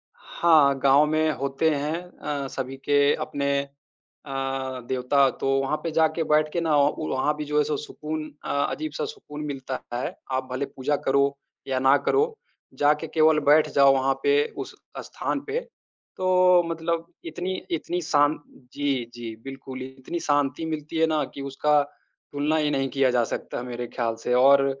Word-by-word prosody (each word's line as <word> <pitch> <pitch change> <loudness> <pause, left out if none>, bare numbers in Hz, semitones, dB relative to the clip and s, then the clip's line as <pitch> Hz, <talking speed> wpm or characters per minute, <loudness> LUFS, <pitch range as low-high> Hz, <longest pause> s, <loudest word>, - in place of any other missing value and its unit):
हाँ, 155 -5 +3
गाँव 140 +3 +5
में 155 +1 +1
होते 140 +4 0
हैं 150 +3 -2
अ, 145 -6 -5
सभी 135 0 -5
के 145 +1 +3
अपने 140 -2 -2 0.7
अ, 135 -1 -3
देवता, 130 +1 +3
तो 135 - -4
वहाँ 145 +3 -1
पे 165 - -2
जाके 160 +1 +2
बैठ 155 0 +3
के 170 - 0
ना 160 -2 +2
ओ 145 +2 +1
वहाँ 150 +3 0
भी 150 - -4
जो 150 +1 -1
है 150 - +5
सो 150 -1 -2
सुकून 155 +1 -5 0.2
अ, - - -6 0.2
अजीब 310 0 -4
सा 470 - -2
सुकून 405 - -8
मिलता 135 -2 -4 0.2
है। 125 - -3 0.2
आप 130 0 -1
भले 130 +2 -1
पूजा 140 +3 -2
करो 140 +1 +2 0.3
या 130 -1 0
ना 135 +2 +5
करो, 445 +2 +2 0.4
जाके 150 +2 +2
केवल 155 -1 +4
बैठ 155 +1 +5
जाओ 140 -1 +7
वहाँ 135 0 +2
पे 430 +1 +4
उस - - -6 0.2
स्थान - - -3
पे, 445 +3 -1 0.6
तो 180 -1 +4
मतलब 165 0 -2 0.2
इतनी 175 +3 -4 0.2
इतनी 175 +2 -2
शान् 150 -2 +2 0.4
जी, 135 -5 -1
जी, 115 -2 -7
बिल्कुल 135 -1 -8
इतनी 130 +6 -6
शांति 145 +2 0
मिलती 155 0 -4
है 160 0 +4
ना 155 -2 +1
कि 140 - -6
उसका 145 +2 +2 0.5
तुलना 145 +2 0
ही 150 -1 +1
नहीं 135 -1 0
किया 135 -2 +2
जा 120 -1 +2
सकता - - -5
मेरे 120 -1 -5
ख्याल 115 -2 -1
से 125 - 0
और 135 +2 +6
145 Hz, 175 wpm, -25 LUFS, 135-160 Hz, 0.7 s, जाओ